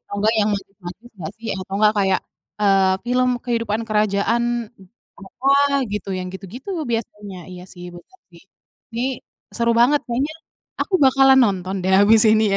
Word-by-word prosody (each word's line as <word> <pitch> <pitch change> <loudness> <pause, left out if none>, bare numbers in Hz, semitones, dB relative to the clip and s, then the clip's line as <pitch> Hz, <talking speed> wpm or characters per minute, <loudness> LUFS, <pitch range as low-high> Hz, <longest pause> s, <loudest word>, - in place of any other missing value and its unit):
Atau 205 - -10
nggak 220 +2 +2
yang 210 - +2
magis-magis 195 +3 -10
nggak 165 -4 -7
sih? 225 - -8
Atau 185 - -10
nggak, 215 0 +4
kayak, 190 -1 +2 0.4
eee, 195 -1 +4
film 250 +1 +1 0.2
kehidupan 230 -3 -1
kerajaan 210 +2 +1 0.8
apa 250 +8 -4 0.4
gitu, 200 -1 -4
yang 185 0 -5
gitu-gitu 205 - -9 0.2
biasanya, 210 -4 -5
iya 180 0 -10
sih, 175 -1 -11
benar 175 - -16
sih. 170 - -17 0.5
Ini, 235 +2 -2 0.5
seru 235 0 +2
banget 285 +4 +4
kayaknya, 275 +6 -2 0.5
aku 385 - -2
bakalan 265 0 +5
nonton 190 -2 -2
deh, 190 - +1
habis 215 +2 +5
ini 220 0 +3
ya, - - +3
210 Hz, 160 wpm, -20 LUFS, 195-240 Hz, 0.8 s, bakalan